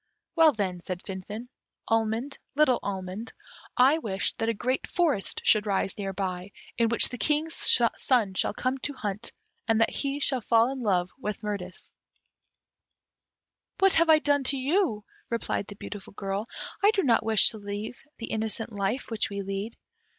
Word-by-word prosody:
"Well, 325 -2 +7
then," 190 -7 -3
said 180 0 -5
Finfin, 205 +5 -7 0.4
"almond, 225 +4 0 0.2
little 285 -4 +4
almond, 195 +3 -5 0.4
I 270 +6 +5
wish 200 -8 -2
that 225 0 0
a - - +2
great 255 +5 -1
forest 315 - 0
should 215 -1 +4
rise 195 -1 +1
near 195 -2 -3
here, 185 -1 -2 0.3
in 230 -1 +3
which 230 - +4
the 250 - -7
King's 305 +2 +1 0.3
son 230 -7 +2
shall 195 - 0
come 255 +1 -1
to 285 +2 -2
hunt, 210 -3 -4 0.4
and 225 -1 +3
that 225 - +3
he 280 0 -2
shall 265 -3 +1
fall 230 +3 +3
in 270 -1 -5
love 185 -5 +1
with 210 -4 -4
Mirtis." 200 -3 -5 1.9
"What 390 -1 +4
have 330 0 +4
I 315 - +8
done 285 -2 +2
to 275 - +3
you," 270 - 0 0.2
replied 230 -3 -2
the 205 - -8
beautiful 200 -1 -9
girl. 200 +2 -3 0.3
"I 405 - +6
do 415 -3 +2
not 235 -5 +3
wish 220 -1 +5
to 220 - -8
leave 205 +3 -6 0.2
the 230 - -6
innocent 220 +1 -2
life 205 +6 -2
which 220 -1 0
we 200 -1 -4
lead." 195 +3 -4
225 Hz, 170 wpm, -27 LUFS, 200-265 Hz, 1.9 s, I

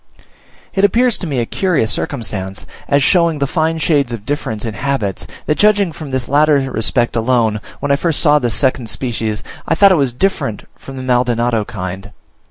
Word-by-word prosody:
It 195 - 0
appears 235 +3 +3
to 180 - -4
me 140 -4 -2
a 120 - 0
curious 160 - 0
circumstance, 100 -7 -3 0.2
as 140 -1 +2
showing 170 -1 +3
the 140 - 0
fine 160 +3 0
shades 145 -5 +1
of 110 -3 -6
difference 115 -6 -3
in 110 - -4
habits, 105 -4 -2 0.2
that 150 - -1
judging 205 -4 +3
from 155 -1 -8
this 130 -2 -2
latter 150 +1 +4
respect 120 +2 +1
alone, 115 -2 +1 0.2
when 145 0 -1
I - - +5
first 165 0 0
saw 150 -2 +4
this 120 -5 -1
second 130 -4 0
species, 110 -4 -3 0.2
I 165 - +2
thought 200 +3 +6
it - - +5
was 135 -3 +1
different 125 - -2
from 135 0 -11
the 130 - -5
Maldonado 120 -3 +1
kind. 95 0 -6
130 Hz, 185 wpm, -16 LUFS, 115-155 Hz, 0.2 s, thought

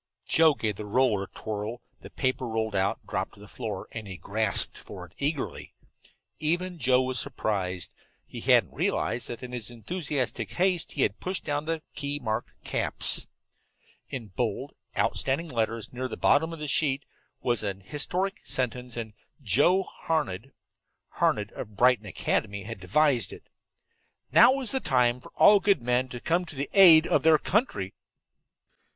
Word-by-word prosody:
Joe 160 -2 +5
gave 105 -6 -2
the 105 - -6
roller 110 -3 +2
a - - -17
twirl, 110 +2 -5 0.2
the - - -10
paper 130 -1 -1
rolled 110 -1 -2
out, 95 -1 0
dropped - - -3
to - - -18
the - - -12
floor, - - -5
and 110 -2 -7
he 95 -2 -6
grasped 110 +4 -1
for - - -9
it - - -19
eagerly. 145 0 -2 0.6
Even 175 +3 -1
Joe 130 -1 +3
was 130 0 0
surprised. 95 -9 -2 0.3
He - - -8
hadn't - - +4
realized 120 - 0
that 120 +1 -6
in 125 - -6
his 120 -3 -3
enthusiastic 125 - -3
haste 180 -2 +1
he - - +1
had - - 0
pushed 185 +1 -3
down 145 +1 -1
the 160 -1 -2
key 145 0 -2
marked 110 -4 -3
"caps." - - +1 0.8
In 120 -5 -6
bold, 90 - -3 0.2
outstanding 150 +5 0
letters 115 -2 -2
near 130 +1 -3
the - - -7
bottom 160 +3 +3
of 165 - -6
the 150 -1 -5
sheet 140 -1 +1 0.4
was 120 -3 +1
an 100 -1 -3
historic 180 - -1
sentence, 125 -1 -2
and 110 -2 -5 0.3
Joe 145 - +3
Harned 135 - -3 0.6
Harned, 105 0 0
of 105 -1 -8
Brighton 125 -3 +4
Academy 100 +1 -1
had 115 0 -7
devised 120 - +2
it. - - -12 0.8
"NOW 265 +2 +7
IS 250 - -1
THE 265 - +1
TIME 125 - +2
FOR - - -14
ALL 205 0 +7
GOOD 195 -10 +2
MEN 125 +1 +1
TO 125 - -6
COME 170 +7 0
TO 160 - -8
THE 140 +1 -3
AID 170 -5 +9
OF - - +2
THEIR 160 -1 +6
COUNTRY!" 150 - -1
130 Hz, 165 wpm, -27 LUFS, 110-155 Hz, 0.8 s, AID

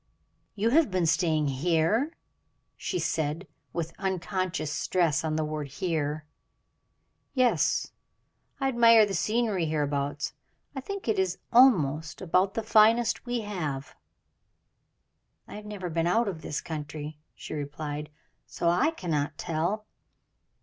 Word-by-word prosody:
"You 215 +3 +1
have 310 -2 +4
been 185 -2 +1
staying 160 -2 +2
here!" 165 - +1 0.6
she - - -3
said, 160 0 -1 0.3
with 165 -1 -3
unconscious 185 -4 -2
stress 165 -3 +1
on 155 -1 -1
the 155 0 0
word 150 -1 -4
"here." 155 -1 -2 1.1
"Yes; 255 -2 +2 0.7
I 270 - +1
admire 230 -3 +6
the 200 - -4
scenery 210 -2 0
hereabouts. 145 -1 -1 0.4
I 270 - -3
think 400 +4 -6
it 220 -3 +1
is 185 -1 0 0.2
almost 160 - +4
about 185 +2 +1
the 225 - -1
finest 225 +3 +4
we 240 -1 -1
have." 160 -9 -4 1.5
"I - - -11
have 210 0 -8
never 200 -4 -5
been 165 +1 +1
out 225 +6 +2
of 170 -5 -4
this 150 - -3
county," 150 -1 -6 0.2
she - - -8
replied, 150 0 -5 0.4
"so 170 - 0
I 180 - +3
cannot 155 - -2
tell." 175 +6 -2
175 Hz, 130 wpm, -28 LUFS, 155-215 Hz, 1.5 s, admire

